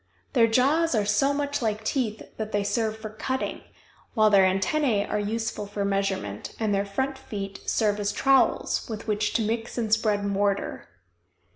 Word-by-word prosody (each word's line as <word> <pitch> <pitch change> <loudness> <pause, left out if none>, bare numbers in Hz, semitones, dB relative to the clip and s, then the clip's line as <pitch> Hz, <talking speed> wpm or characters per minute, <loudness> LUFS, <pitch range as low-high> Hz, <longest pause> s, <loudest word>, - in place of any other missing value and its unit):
Their 235 -4 +5
jaws 275 +7 +3
are 210 -2 +2
so 240 +7 +2
much 285 0 -1
like 220 -1 -1
teeth 220 -3 -1
that 220 -1 -4
they 205 0 +1
serve 220 +1 -1
for 220 -1 -7
cutting, 260 +4 -3 0.5
while 215 -2 +5
their 190 -2 +6
antennæ 210 +2 +1
are 210 - -1
useful 220 0 -3
for 205 0 -3
measurement, 195 - -2
and 215 -2 +1
their 200 0 0
front 265 +7 -2
feet 195 -6 -6
serve 210 -2 +1
as 205 0 0
trowels 270 +3 +2
with 220 -1 -5
which 210 0 0
to 225 - +1
mix 225 +2 -3
and 220 -3 0
spread 215 -2 +2
mortar. 200 0 -1
215 Hz, 170 wpm, -26 LUFS, 205-235 Hz, 0.5 s, their